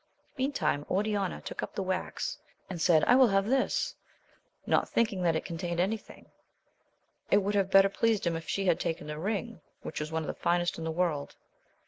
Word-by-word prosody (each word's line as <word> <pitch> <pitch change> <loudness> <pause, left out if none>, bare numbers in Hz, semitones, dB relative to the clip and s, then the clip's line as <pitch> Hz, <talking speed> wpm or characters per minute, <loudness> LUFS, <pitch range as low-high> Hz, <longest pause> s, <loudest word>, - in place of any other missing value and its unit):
Meantime 265 - 0
Oriana 200 -1 0
took - - -6
up - - -6
the 195 - -1
wax, 185 - -3 0.3
and 175 -3 -5
said, 160 -2 +5
I - - +5
will 260 -1 +7
have 195 -2 +2
this, 260 +4 +1 0.7
not - - +2
thinking 215 -5 +1
that 170 -2 +2
it 160 - -2
contained 170 0 -3
any 195 +5 +2
thing: - - -17 1.0
it - - +5
would 205 +2 0
have 195 -2 +2
better 195 0 +7
pleased 220 0 +1
him 170 -1 +1
if 165 0 -6
she 195 - -1
had 175 -3 +3
taken 165 -3 -2
the 150 0 -5
ring, 210 +1 -3 0.2
which - - -5
was 150 +1 -4
one 160 0 -1
of - - -6
the - - -2
finest 175 0 0
in 165 - -4
the - - -1
world. 160 -4 -1
185 Hz, 200 wpm, -30 LUFS, 165-205 Hz, 1.0 s, will